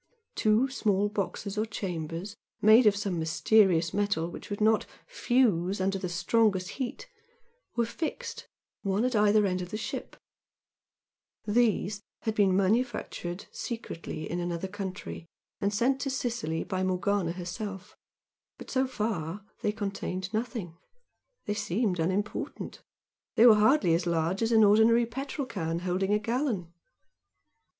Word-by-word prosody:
Two 215 +4 +3
small 205 -6 +1
boxes 200 0 -3
or 215 - +1
chambers, 180 -1 -4 0.2
made 220 +2 +7
of 205 - +5
some 200 -4 -2
mysterious 170 0 +3
metal 200 -5 0
which - - -9
would 205 - -4
not 220 0 +3 0.2
"fuse" 225 - +1
under 195 +1 0
the 185 - -3
strongest 185 +2 +2
heat, 265 - -5 0.7
were 235 -1 +2
fixed, 310 +7 -5 0.3
one 200 +3 0
at 255 -2 0
either 210 0 +4
end 185 -1 0
of 180 - -6
the 215 - -4
ship; 215 - -5 1.3
these 210 -2 +1 0.2
had 220 - -1
been 195 -3 +3
manufactured 200 -3 -1
secretly 195 -9 -5
in 175 - -3
another 175 +1 -2
country 190 -3 -6 0.3
and 200 - 0
sent 250 +6 +1
to 275 - -1
Sicily 235 -11 -2
by 185 -1 -3
Morgana 185 -1 0
herself, 185 +2 -6 0.6
but - - -10
so 260 0 +2
far, 205 -6 -3 0.2
they 210 - +1
contained 195 -3 -4
nothing. 215 -7 -3 0.7
They 210 - -1
seemed 205 -2 -1
unimportant 190 +5 -2 0.5
they 230 - +6
were 235 - +10
hardly 210 - +4
as 170 +2 +1
large 170 +3 0
as 225 +1 +1
an 220 -1 +6
ordinary 220 +3 +5
petrol 270 +4 -4
can 165 -9 -3
holding 185 +2 -1
a 210 - +4
gallon. 220 - -2
205 Hz, 140 wpm, -29 LUFS, 180-225 Hz, 1.3 s, were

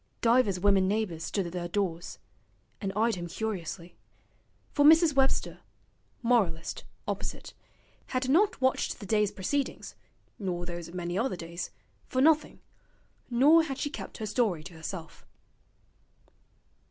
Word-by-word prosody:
Divers 230 -5 +3
women 195 -1 +4
neighbours 195 -6 -1
stood 195 -3 -1
at 170 - -5
their 175 -1 -3
doors, 175 -2 -2 0.6
and 195 -2 -2
eyed 225 +2 +2
him 175 -3 -4
curiously; 180 -3 -5 0.8
for 290 - +2
Mrs. 320 +1 +7
Webster, 270 0 +1 0.6
moralist, 200 -9 +1 0.2
opposite, - - -4 0.5
had 255 0 -1
not 380 +10 +3
watched 260 0 +1
the 205 - -8
day's 210 0 +2
proceedings 275 +9 -2 0.5
(nor 180 -3 -3
those 175 -1 -6
of 170 - -11
many 175 +1 -2
other 255 -3 0
days) 170 0 -6 0.4
for 255 - -1
nothing, 310 +2 +3 0.7
nor 280 +7 +6
had 275 -5 -4
she 290 - -2
kept - - -7
her 220 - -4
story 210 -7 0
to 175 - -10
herself. 160 0 -7
205 Hz, 135 wpm, -29 LUFS, 175-255 Hz, 0.8 s, Mrs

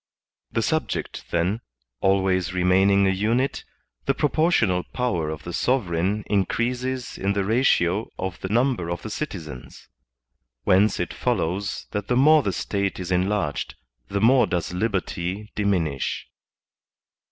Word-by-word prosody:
The - - 0
subject, - - -2
then, 90 +7 0 0.4
always 95 -1 +1
remaining 95 +2 +4
a 95 - +3
unit, 115 +8 0 0.4
the 135 - +2
proportional 150 - +2
power 90 -7 -2
of 80 -1 -6
the 85 - -6
sovereign 100 -3 0
increases 125 +6 -1
in 100 +1 +1
the 100 -1 0
ratio 110 -4 +2
of 95 -1 -4
the - - -3
ntmiber 115 -5 +1
of 85 - -4
the 110 - -6
citizens. 80 - -7 0.7
Whence 100 +3 +3
it - - -2
follows 95 +5 -1
that 105 -1 -3
the 125 - +1
more 155 +3 +6
the 100 - -1
State 100 +1 -2
is 90 0 -5
enlarged, 95 -4 0 0.3
the 100 - -2
more 125 +3 +5
does 90 0 -2
liberty 95 0 -2
diminisn. 90 -9 0
100 Hz, 130 wpm, -24 LUFS, 90-115 Hz, 0.7 s, more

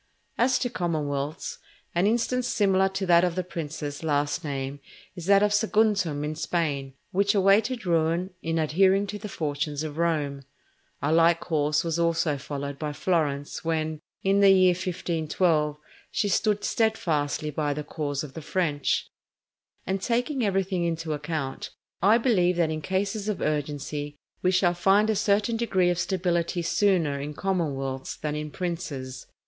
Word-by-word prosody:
As 250 +2 +3
to 245 - -1
commonwealths, 150 -3 -2 0.3
an 175 +3 +2
instance 240 +2 +1
similar 195 -4 +3
to 190 0 -3
that 170 -1 +5
of 175 -2 +1
the 185 - -1
princes 150 -4 -5
last 145 +2 0
named, 140 -1 -4 0.4
is 175 -2 -7
that 200 0 +6
of 210 0 +2
Saguntum 210 -8 +2
in 150 +1 -2
Spain, 145 -4 -2 0.2
which 200 +2 +2
awaited 205 +4 +3
ruin 170 +2 +1
in 165 0 -1
adhering 190 +5 +3
to 205 +1 -6
the 210 - -7
fortunes 150 -2 -2
of 155 0 -5
Rome. 150 -5 0 0.6
A 150 +2 +2
like 165 +1 +5
course 150 -3 0
was 165 0 -1
also 165 -3 +1
followed 140 0 -5
by 150 -1 -3
Florence 145 -4 -1
when, 160 -1 -1 0.2
in 195 +1 +3
the 200 -1 +7
year 185 -1 +6
1512, 165 -3 0 0.3
she 205 - 0
stood 205 +1 +1
steadfastly 155 -10 0
by 150 0 -1
the 150 +1 -3
cause 145 -2 -3
of 140 -3 -9
the 160 - -7
French. 150 -4 0 0.8
And 190 0 -1
taking 245 +4 0
everything 190 -3 0
into 165 -2 -2
account, 150 -2 -4 0.3
I 205 +5 +6
believe 190 -8 +2
that 170 -2 +1
in 155 0 -3
cases 200 +4 -1
of 210 - -2
urgency, 145 0 -2 0.3
we 180 - +3
shall 185 -1 +3
find 200 +5 +3
a - - 0
certain 210 +2 +1
degree 190 -6 +2
of 175 - -2
stability 175 -2 0
sooner 170 -5 +2
in 145 +1 -5
commonwealths 140 -9 -2
than 150 -1 -3
in 150 0 -4
princes. 145 -7 -5
170 Hz, 155 wpm, -26 LUFS, 150-195 Hz, 0.8 s, the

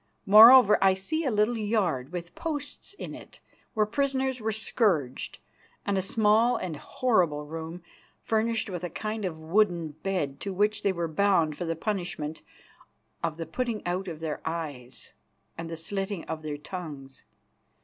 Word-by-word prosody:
Moreover, 215 +1 +9
I 190 -1 +5
see 315 +12 -2
a - - +2
little 215 +1 +2
yard, 185 - 0
with 175 -1 -6
posts 295 +4 -5
in - - -7
it, - - -12 0.4
where 215 -1 +3
prisoners 265 +1 0
were 220 0 0
scourged, 190 - 0 0.5
and 200 - 0
a 190 - +2
small 220 +4 +3
and 175 -4 -4
horrible 170 - 0
room, 165 +3 -7 0.4
furnished 225 +1 0
with 180 -3 -5
a 175 - -2
kind 215 +4 -4
of 170 -4 -3
wooden 170 0 +1
bed, 150 -3 -3
to 195 - -4
which 210 +2 +1
they 200 - +2
were 170 -2 -2
bound 165 -2 +2
for 175 - -4
the 165 0 -1
punishment 175 -5 -3 0.8
of 165 -2 -2
the 165 - -4
putting 230 +6 -3
out 180 +2 -2
of 160 -3 -6
their 155 -2 -3
eyes 150 -7 -6 0.4
and 165 0 -6
the 165 - -5
slitting 195 +2 -3
of 160 -1 -5
their 150 -1 -4
tongues. 145 -5 -8
185 Hz, 160 wpm, -28 LUFS, 160-215 Hz, 0.8 s, Moreover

